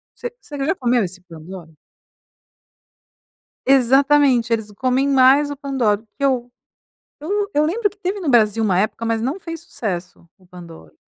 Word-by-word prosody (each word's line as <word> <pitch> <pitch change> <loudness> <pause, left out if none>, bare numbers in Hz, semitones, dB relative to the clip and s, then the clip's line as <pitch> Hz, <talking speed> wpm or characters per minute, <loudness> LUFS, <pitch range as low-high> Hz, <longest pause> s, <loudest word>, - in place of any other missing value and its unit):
você 485 0 -6
você 290 - -9
já 320 - +1
comeu 245 -5 +1
esse 185 0 -7
Pandoro? 165 -1 -12 1.9
Exatamente, 270 -1 +4
eles 220 -2 -1
comem 255 +5 0
mais 275 +2 +4
o 285 - -6
Pandoro 260 -7 0
o - - -33
que - - -5
eu 250 -3 0 0.7
eu 400 +7 -2
eu 295 +1 +2
lembro 410 +6 0
que 410 - -24
teve 385 +2 -3
no 340 -6 -2
Brasil 225 -3 +3
uma 190 -4 +2
época 220 +3 -2
mas 225 -1 -1
não 270 +10 -2
fez 330 -2 -7
sucesso, 180 - -6
o 185 - -25
Pandoro. 170 - -13
250 Hz, 160 wpm, -20 LUFS, 205-290 Hz, 1.9 s, Exatamente